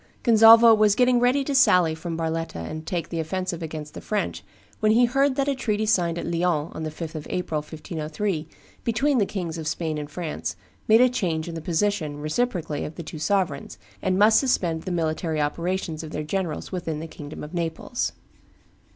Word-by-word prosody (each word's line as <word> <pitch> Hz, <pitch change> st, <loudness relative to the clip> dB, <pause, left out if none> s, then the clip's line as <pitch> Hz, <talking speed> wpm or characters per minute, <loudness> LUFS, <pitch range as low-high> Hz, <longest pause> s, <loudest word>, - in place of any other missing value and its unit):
Gonzalvo 225 Hz, 0 st, +8 dB
was 215 Hz, -2 st, +4 dB
getting 250 Hz, 0 st, +4 dB
ready 250 Hz, +3 st, +3 dB
to 280 Hz, -, -2 dB
sally 180 Hz, -11 st, +5 dB
from 165 Hz, +1 st, -5 dB
Barletta 165 Hz, 0 st, -2 dB
and 155 Hz, -, -6 dB
take 175 Hz, -2 st, -2 dB
the 165 Hz, -, -3 dB
offensive 175 Hz, +1 st, -3 dB
against 155 Hz, -2 st, -6 dB
the -, -, -8 dB
French 210 Hz, -1 st, -2 dB, 0.4 s
when 215 Hz, 0 st, +3 dB
he 240 Hz, +2 st, +5 dB
heard 270 Hz, +2 st, +2 dB
that 275 Hz, 0 st, 0 dB
a 280 Hz, -, +2 dB
treaty 215 Hz, -4 st, -1 dB
signed 175 Hz, -6 st, +1 dB
at -, -, -4 dB
Lyons 170 Hz, -2 st, 0 dB
on -, -, -6 dB
the 155 Hz, -, -2 dB
5th 160 Hz, +1 st, -7 dB
of 155 Hz, -2 st, -6 dB
April, 165 Hz, -4 st, -2 dB
1503, 155 Hz, +3 st, -4 dB, 0.4 s
between 250 Hz, +4 st, +1 dB
the 200 Hz, -, +2 dB
Kings 170 Hz, -4 st, -4 dB
of 155 Hz, -, -5 dB
Spain 160 Hz, -1 st, -2 dB
and 145 Hz, -1 st, -6 dB
France, 160 Hz, 0 st, -4 dB, 0.3 s
made 220 Hz, +2 st, +6 dB
a 255 Hz, -, +7 dB
change 175 Hz, -11 st, -1 dB
in 170 Hz, -, -5 dB
the 165 Hz, -, -5 dB
position, 165 Hz, -2 st, -1 dB
reciprocally, 155 Hz, -1 st, -2 dB
of 155 Hz, -, -6 dB
the 170 Hz, -, -6 dB
two 155 Hz, 0 st, -8 dB
sovereigns, 180 Hz, -5 st, -1 dB, 0.2 s
and 185 Hz, 0 st, +1 dB
must 215 Hz, +2 st, +6 dB
suspend 175 Hz, -, 0 dB
the 185 Hz, -, -5 dB
military 160 Hz, -1 st, -1 dB
operations 165 Hz, +2 st, -2 dB
of 160 Hz, -, -7 dB
their 150 Hz, 0 st, -4 dB
generals 170 Hz, 0 st, -3 dB
within 165 Hz, -4 st, -3 dB
the 160 Hz, -, -5 dB
kingdom 150 Hz, -2 st, -9 dB
of 150 Hz, +3 st, -9 dB
Naples. 170 Hz, +7 st, -2 dB
170 Hz, 195 wpm, -24 LUFS, 160-215 Hz, 0.4 s, Gonzalvo